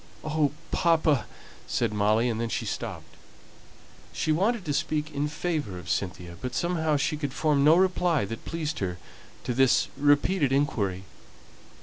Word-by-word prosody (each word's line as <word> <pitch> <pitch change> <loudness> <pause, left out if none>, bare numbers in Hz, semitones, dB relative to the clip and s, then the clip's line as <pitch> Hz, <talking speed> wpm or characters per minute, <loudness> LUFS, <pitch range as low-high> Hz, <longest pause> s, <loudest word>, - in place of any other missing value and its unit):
"Oh, 155 -2 +1 0.2
papa 160 -5 +2 0.2
" - - -19
said - - 0
Molly, 105 +3 +2
and 115 -1 -1
then 115 - -2
she - - -2
stopped; - - -6 1.0
she 155 - -1
wanted 195 +5 +1
to 145 - -1
speak 155 +2 -1
in 145 0 -1
favour 150 - -3
of 90 -1 -5
Cynthia, 90 -2 -3
but 125 - -4
somehow 160 -3 +1
she 145 +2 0
could 145 -3 -4
form 150 -3 +2
no 155 +3 +7
reply 180 - +2
that 115 +3 -7
pleased 160 -2 -3
her 90 -3 -2 0.5
to 125 - -2
this 130 0 +3
repeated 145 +1 +3
inquiry. 105 -10 0
145 Hz, 155 wpm, -27 LUFS, 115-160 Hz, 1.0 s, no